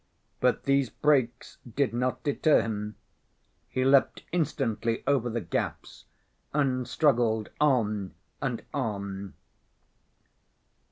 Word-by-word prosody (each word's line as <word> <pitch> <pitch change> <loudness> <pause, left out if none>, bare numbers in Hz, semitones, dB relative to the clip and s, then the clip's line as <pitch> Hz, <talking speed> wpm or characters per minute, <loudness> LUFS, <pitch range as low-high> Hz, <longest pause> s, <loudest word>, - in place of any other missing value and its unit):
But - - +2
these 140 -2 +2
breaks 130 -5 0 0.2
did 140 -4 +1
not 125 +1 -1
deter 150 +2 +3
him. 105 -1 -4 0.7
He 130 0 0
leapt 135 0 +4
instantly 130 -9 -1
over 130 -4 +2
the 115 0 -2
gaps, 85 - -4 0.5
and 130 -4 +1
struggled 120 -7 +2
on 110 -9 +1 0.3
and 125 -4 -2
on. 100 -6 -4
125 Hz, 100 wpm, -28 LUFS, 110-140 Hz, 0.7 s, leapt